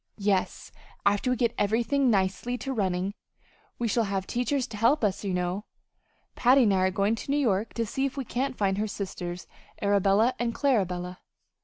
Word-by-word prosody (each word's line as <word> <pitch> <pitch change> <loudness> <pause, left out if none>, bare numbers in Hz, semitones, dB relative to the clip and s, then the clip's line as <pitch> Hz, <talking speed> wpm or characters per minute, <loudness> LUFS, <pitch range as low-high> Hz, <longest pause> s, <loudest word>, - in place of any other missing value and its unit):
"Yes. 200 -3 -1 0.3
After 205 +5 +2
we 250 - +2
get 235 -1 +1
everything 240 +6 +2
nicely 200 +4 0
to 270 +1 -4
running 190 -3 -1 0.6
we 240 - -1
shall 230 +1 +1
have 195 -1 -2
teachers 250 +4 -1
to 220 - -7
help 235 +6 +3
us, 200 -1 0
you 200 - -2
know 180 +3 -2 0.7
Patty 255 +2 +5
and 205 -4 +3
I - - +2
are 185 0 +3
going 200 +3 +1
to 230 - -6
New 285 - +2
York 220 -6 0
to 230 - 0
see 270 +5 -1
if 270 - -9
we 270 - -3
can't 260 +3 -2
find 195 -1 +1
her 215 - 0
sisters, 180 -3 -5 0.3
Arabella 200 +4 +3
and 235 -1 -1
Clarabella." 185 -9 0
210 Hz, 185 wpm, -27 LUFS, 195-245 Hz, 0.7 s, Patty